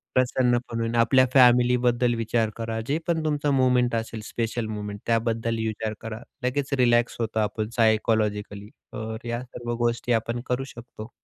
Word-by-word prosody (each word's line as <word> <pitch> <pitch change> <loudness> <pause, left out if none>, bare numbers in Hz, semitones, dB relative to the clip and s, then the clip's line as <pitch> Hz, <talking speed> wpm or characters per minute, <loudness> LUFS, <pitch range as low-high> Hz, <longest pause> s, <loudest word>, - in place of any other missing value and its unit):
प्रसन्न 125 -1 +3
पण 115 - -3
होईल. 115 0 -1
आपल्या 125 +3 +5
फॅमिलीबद्दल 125 -1 +4
विचार 115 -1 0
करा. 115 -1 -3
जे 145 - +1
पण 165 -2 0
तुमचं 150 -1 0
मोमेंट 125 -2 +3
असेल, 115 -1 -4
स्पेशल 115 0 -3
मोमेंट 105 -1 -5
त्याबद्दल 115 0 0
विचार 110 0 -3
करा. 110 0 -6 0.2
लगेच 135 +2 -1
रिलॅक्स 120 -1 +3
होतो 110 -1 -1
आपण 105 0 -1
सायकॉलॉजिकली. 105 -2 +1 0.2
तर 110 +1 -6
या 120 +1 -2
सर्व 120 -1 -6
गोष्टी 120 +1 0
आपण 115 +1 -1
करू 125 +1 -1
शकतो. 115 -2 -10
115 Hz, 155 wpm, -25 LUFS, 110-125 Hz, 0.2 s, आपल्या